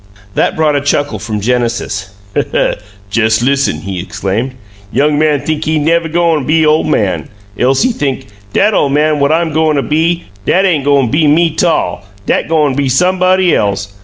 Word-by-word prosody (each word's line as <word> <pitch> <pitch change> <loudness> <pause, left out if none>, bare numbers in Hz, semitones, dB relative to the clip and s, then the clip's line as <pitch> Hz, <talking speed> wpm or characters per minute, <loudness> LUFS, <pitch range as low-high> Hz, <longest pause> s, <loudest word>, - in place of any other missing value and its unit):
That - - 0
brought 155 -3 +1
a 140 - +1
chuckle 145 -5 -1
from 105 +1 -4
Mr. - - -8
Genesis. 120 -5 -1 1.0
"Jes' 110 +2 +1
listen!" 135 - 0
he 95 -2 -5
exclaimed. 100 +6 -3 0.4
"Young 145 +1 +1
man 150 -2 +2
think 155 -1 -3
he 155 - 0
ain' 150 -1 0
nev' 165 0 +1
goin' 165 -3 +1
be 155 +3 +2
ole 155 +1 +3
man. 105 -11 -1 0.3
Else 130 - +2
he 255 - +2
think, 140 - -3 0.3
'Dat 210 - +2
ole 145 - +2
man 150 +1 +1
what 140 +1 +2
I'm 165 -1 0
goin' 155 0 +2
to 140 - 0
be, 165 +3 0 0.2
dat 190 +2 +3
ain' 165 -6 +2
goin' 140 -3 +2
be 150 +2 +2
me 165 +3 +3
'tall 160 - 0 0.2
dat - - 0
goin' 150 -4 +2
be 140 0 0
somebody 185 +4 +2
else! 100 0 -1
145 Hz, 185 wpm, -13 LUFS, 125-160 Hz, 1.0 s, ole